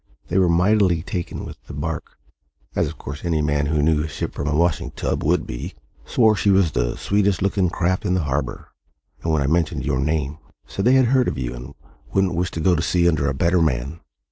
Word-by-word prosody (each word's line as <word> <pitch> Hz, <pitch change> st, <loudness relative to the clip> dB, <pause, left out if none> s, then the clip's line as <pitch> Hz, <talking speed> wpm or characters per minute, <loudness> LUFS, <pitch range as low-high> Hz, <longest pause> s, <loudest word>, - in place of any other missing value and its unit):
They 90 Hz, -, +2 dB
were 90 Hz, -2 st, +3 dB
mightily 90 Hz, -1 st, +3 dB
taken 90 Hz, -1 st, -4 dB
with -, -, -9 dB
the -, -, -8 dB
barque 80 Hz, +2 st, -5 dB, 0.6 s
as -, -, +1 dB
of -, -, -7 dB
course 75 Hz, 0 st, -8 dB
any 80 Hz, -3 st, 0 dB
man 75 Hz, 0 st, +1 dB
who 75 Hz, -1 st, +1 dB
knew 75 Hz, 0 st, +3 dB
a -, -, -3 dB
ship -, -, -5 dB
from 70 Hz, -, -4 dB
a 75 Hz, -, 0 dB
washing 85 Hz, 0 st, +1 dB
tub -, -, -3 dB
would 80 Hz, +2 st, +1 dB
be -, -, -6 dB, 0.3 s
swore 110 Hz, -3 st, +4 dB
she 100 Hz, +2 st, +1 dB
was 95 Hz, -4 st, +4 dB
the -, -, -1 dB
sweetest 100 Hz, -2 st, +1 dB
looking 95 Hz, -2 st, +1 dB
craft 90 Hz, +2 st, 0 dB
in 90 Hz, -, +1 dB
the 90 Hz, -, 0 dB
harbour; 70 Hz, -3 st, -3 dB, 0.5 s
and, 80 Hz, -, -1 dB
when 75 Hz, -3 st, +2 dB
I -, -, -1 dB
mentioned 80 Hz, +2 st, 0 dB
your 70 Hz, -3 st, 0 dB
name, 75 Hz, 0 st, -1 dB, 0.3 s
said 100 Hz, -, -4 dB
they 125 Hz, +2 st, +5 dB
had 130 Hz, -1 st, +5 dB
heard 125 Hz, +1 st, +3 dB
of -, -, -2 dB
you 60 Hz, -1 st, -3 dB
and 60 Hz, +1 st, -9 dB, 0.4 s
wouldn't 95 Hz, -2 st, +2 dB
wish 90 Hz, +2 st, -1 dB
to 85 Hz, -, -6 dB
go 90 Hz, +3 st, +3 dB
to 80 Hz, -, 0 dB
sea 85 Hz, 0 st, +2 dB
under 75 Hz, -4 st, +2 dB
a 65 Hz, -, -2 dB
better 85 Hz, +5 st, +2 dB
man. 70 Hz, +1 st, -1 dB
80 Hz, 230 wpm, -22 LUFS, 75-90 Hz, 0.6 s, they